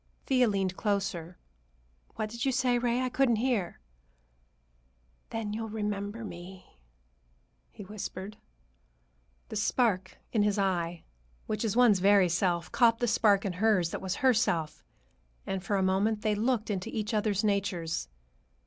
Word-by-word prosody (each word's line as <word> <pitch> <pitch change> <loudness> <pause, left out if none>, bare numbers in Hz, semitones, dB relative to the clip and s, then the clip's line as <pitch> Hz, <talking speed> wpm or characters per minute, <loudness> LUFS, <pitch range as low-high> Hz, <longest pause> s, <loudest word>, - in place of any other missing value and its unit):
Thea 255 -2 +3
leaned 195 -3 0
closer. 195 -5 -2 0.8
"What 215 -1 -3
did 235 +1 -5
you 270 - +2
say, 250 -1 +2
Ray? 240 +1 +1
I 255 - 0
couldn't 250 -2 +2
hear." 220 -6 -1 1.5
"Then 220 -2 -4
you'll 220 0 -4
remember 210 +1 -3
me," 180 - -11 0.9
he 205 - -11
whispered. 200 0 -7 1.1
The 220 - -6
spark 210 -3 0 0.2
in 220 - +3
his 205 0 +2
eye, 175 -4 -1 0.4
which 215 0 -2
is 220 -2 -1
one's 235 -6 +5
very 195 -1 +5
self, 170 0 0
caught 230 -2 +4
the 240 - 0
spark 210 -3 +3
in 195 - -1
hers 185 -3 +2
that - - -4
was 185 -1 -2
herself, 175 -11 +1 0.6
and 195 -1 -3
for 200 - -1
a 190 - +1
moment 200 +3 +1
they 215 -1 +2
looked 225 +1 0
into 185 -2 -3
each 215 +1 -3
other's 210 -1 +1
natures. 185 - -1
205 Hz, 145 wpm, -29 LUFS, 190-225 Hz, 1.5 s, one's